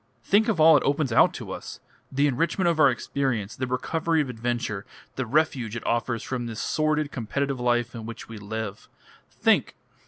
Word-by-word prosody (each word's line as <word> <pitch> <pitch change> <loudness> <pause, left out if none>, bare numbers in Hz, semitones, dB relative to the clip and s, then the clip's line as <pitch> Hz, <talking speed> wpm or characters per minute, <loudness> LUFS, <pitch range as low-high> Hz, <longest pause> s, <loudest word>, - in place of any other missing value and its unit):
Think 210 - +3
of 215 -7 0
all 160 0 +8
it - - 0
opens 140 -2 +1
out 115 - +5
to - - -7
us - - -7 0.3
the 140 +2 +2
enrichment 165 +6 +1
of 170 -2 +1
our 140 -2 +7
experience, 120 -4 -2
the 130 - -3
recovery 160 +6 0
of 145 -4 0
adventure, 120 -4 -2 0.3
the 130 -2 -3
refuge 130 -5 +1
it 115 - -6
offers 115 -1 -1
from 125 -2 -3
this 115 -1 -6
sordid, 155 -1 0
competitive 135 +3 -2
life 120 -1 +1
in 115 -1 -7
which 115 - -8
we 115 -2 -9
live! 105 0 -6 0.4
Think!" - - +2
125 Hz, 185 wpm, -26 LUFS, 115-150 Hz, 0.4 s, all